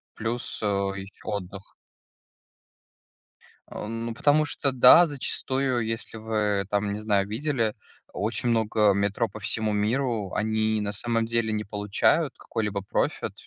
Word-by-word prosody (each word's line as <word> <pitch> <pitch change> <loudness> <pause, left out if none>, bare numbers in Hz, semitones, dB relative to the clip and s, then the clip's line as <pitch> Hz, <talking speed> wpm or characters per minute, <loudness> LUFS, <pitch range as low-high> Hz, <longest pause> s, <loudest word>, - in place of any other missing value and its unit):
плюс, 115 +2 -4
э, - - -2
ещё 100 -1 -3
отдых. 100 -1 -6 2.0
Ну, 115 +2 -4
потому 145 +5 +3
что, 140 -2 -1
да, 130 +7 +8
зачастую, 130 -4 -1
если 115 0 -4
вы 105 -3 0
там, 100 0 0
не 105 - -3
знаю, 100 -2 +1
видели 115 -1 -1 0.4
очень 115 +4 -2
много 110 -2 +3
метро 100 +4 0
по 110 - -10
всему 110 +2 -1
миру, 110 -1 0
они 110 0 +1
на 100 -1 -2
самом 115 +2 0
деле 115 -1 0
не 105 0 -2
получают 105 -1 +1
какой-либо 105 -3 -3
профит. 100 - -1
110 Hz, 130 wpm, -26 LUFS, 105-115 Hz, 2.0 s, да